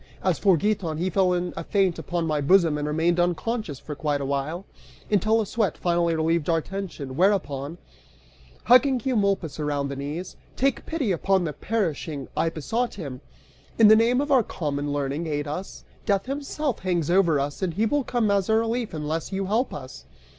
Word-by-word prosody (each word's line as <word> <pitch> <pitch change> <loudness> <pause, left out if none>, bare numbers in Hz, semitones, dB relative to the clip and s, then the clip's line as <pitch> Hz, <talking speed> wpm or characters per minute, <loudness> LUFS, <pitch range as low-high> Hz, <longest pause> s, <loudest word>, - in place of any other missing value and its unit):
As 185 -3 +1
for 190 -4 +4
Giton, 190 -4 -1
he 180 +3 -1
fell 185 0 +3
in 175 0 -2
a - - -4
faint 190 -5 +1
upon 170 +2 -2
my 155 -2 0
bosom 165 +1 +4
and 150 0 -2
remained 165 +3 +1
unconscious 175 - -1
for 150 - -7
quite 145 0 -1
a 140 - -3
while, 140 +7 -2 0.5
until 215 +2 +3
a 220 - 0
sweat 205 -4 -1
finally 170 -1 +1
relieved 160 0 0
our 165 -1 +3
tension, 165 -7 -6
whereupon, 165 -5 +1 0.9
hugging 255 +2 +5
Eumolpus 200 - 0
around 145 -2 -1
the 140 - -4
knees, 145 +6 -5 0.2
"Take 275 +1 0
pity 295 -10 -1
upon 190 +2 +2
the 155 -3 -3
perishing," 160 -7 -2
I 165 - +1
besought 225 - -2
him, 140 -10 -7 0.6
"in 220 -2 +7
the 220 - +9
name 235 +4 +3
of 290 0 -3
our 265 -3 +6
common 145 -7 -3
learning, 145 +3 -2
aid 145 -1 -2
us! 180 +6 -6 0.2
Death 200 -1 +2
himself 280 -1 -3
hangs 175 -3 0
over 175 -5 +4
us, 145 +5 -3
and 180 -3 -1
he 215 +4 +2
will 285 +5 +1
come 235 -4 0
as 200 -1 +1
a 220 - +4
relief 230 -3 -1
unless 155 +3 -3
you 195 0 -2
help 225 +7 0
us!" 130 - -9
175 Hz, 190 wpm, -25 LUFS, 150-210 Hz, 0.9 s, the